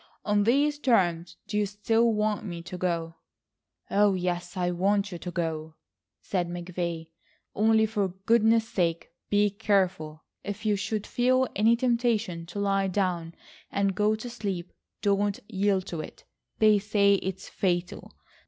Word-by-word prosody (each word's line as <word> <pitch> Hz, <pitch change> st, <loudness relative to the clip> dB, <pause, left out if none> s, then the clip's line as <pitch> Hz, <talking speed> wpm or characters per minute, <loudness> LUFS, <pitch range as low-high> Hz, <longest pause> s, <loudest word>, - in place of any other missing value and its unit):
On 205 Hz, -1 st, +2 dB
these 290 Hz, +5 st, +2 dB
terms 175 Hz, -, +1 dB
do 210 Hz, -1 st, -1 dB
you 205 Hz, -, +1 dB
still 225 Hz, +3 st, +2 dB
want 210 Hz, -1 st, 0 dB
me 170 Hz, -4 st, -6 dB
to 180 Hz, -, -7 dB
go?" 170 Hz, -2 st, -2 dB, 0.7 s
"Oh, 205 Hz, -1 st, +4 dB
yes, 180 Hz, 0 st, -3 dB
I 180 Hz, -1 st, 0 dB
want 200 Hz, +3 st, +1 dB
you 175 Hz, -, -6 dB
to 180 Hz, -, -6 dB
go," 160 Hz, -2 st, -3 dB, 0.5 s
said 180 Hz, -3 st, -1 dB
McVay, 175 Hz, -2 st, -4 dB, 0.4 s
"only 220 Hz, +1 st, +4 dB
for 210 Hz, -2 st, 0 dB
goodness 225 Hz, +4 st, +2 dB
sake 170 Hz, -5 st, -1 dB, 0.2 s
be 205 Hz, 0 st, +3 dB
careful. 190 Hz, -7 st, 0 dB, 0.2 s
If 205 Hz, +2 st, -6 dB
you 210 Hz, -1 st, +3 dB
should 205 Hz, +1 st, -3 dB
feel 255 Hz, +1 st, +2 dB
any 220 Hz, +3 st, +4 dB
temptation 230 Hz, -8 st, 0 dB
to 175 Hz, -, -9 dB
lie 195 Hz, -1 st, +1 dB
down 180 Hz, -3 st, -1 dB, 0.4 s
and 200 Hz, -1 st, +1 dB
go 210 Hz, +3 st, +2 dB
to 215 Hz, +3 st, -7 dB
sleep 200 Hz, -7 st, -5 dB, 0.3 s
don't 200 Hz, 0 st, +1 dB
yield 195 Hz, -1 st, 0 dB
to 170 Hz, -4 st, -4 dB
it; -, -, -11 dB, 0.3 s
they 215 Hz, -1 st, +5 dB
say 200 Hz, -1 st, +3 dB
it's 190 Hz, +1 st, -5 dB
fatal. 175 Hz, -2 st, -2 dB
200 Hz, 150 wpm, -27 LUFS, 175-215 Hz, 0.7 s, they